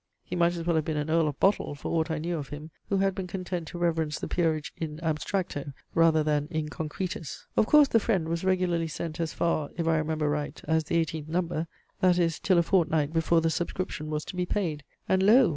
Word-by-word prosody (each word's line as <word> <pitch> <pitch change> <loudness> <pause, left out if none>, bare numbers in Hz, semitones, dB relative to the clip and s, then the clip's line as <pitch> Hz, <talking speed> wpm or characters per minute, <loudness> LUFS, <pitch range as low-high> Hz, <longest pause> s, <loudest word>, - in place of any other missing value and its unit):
He 180 - -5
might 175 0 +3
as 165 -1 -4
well 170 -2 +2
have 155 - 0
been 155 -2 -1
an 150 +1 -1
Earl 165 -1 +3
of 145 - -4
Bottle, 195 -6 +2
for 140 - -6
aught 165 0 +1
I 160 - -1
knew 170 +3 -2
of 145 -4 -5
him, 150 +2 -8 0.2
who 200 - +2
had 195 0 +2
been 190 -1 -4
content 180 -2 -4
to 175 - -7
reverence 160 -3 0
the - - -4
peerage 160 -4 0
in 155 -2 -5
abstracto, 155 -2 -2 0.2
rather 165 -2 +4
than 150 -1 +1
in 155 -2 -2
concretis. 160 0 -5
Of 215 - +3
course 300 -1 +7
THE 230 - +4
FRIEND 190 -7 0
was 165 +1 -2
regularly 180 -3 +1
sent 160 +1 -5
as 165 -2 -1
far, 155 -3 0
if 165 -1 -1
I 160 -1 +3
remember 155 0 -1
right, 145 0 -2
as 160 0 +2
the 160 - 0
eighteenth 160 -2 -1
number; 165 -1 -1 0.3
that 180 -1 +4
is, 165 -3 +1
till 185 -3 +3
a 170 - +5
fortnight 160 -4 +2
before 165 0 +3
the 165 0 +1
subscription 165 -1 -3
was 150 0 -2
to - - -7
be 180 0 -1
paid. 160 -8 -1 0.2
And 190 0 +3
lo! 225 +3 +6
165 Hz, 235 wpm, -28 LUFS, 155-180 Hz, 0.3 s, course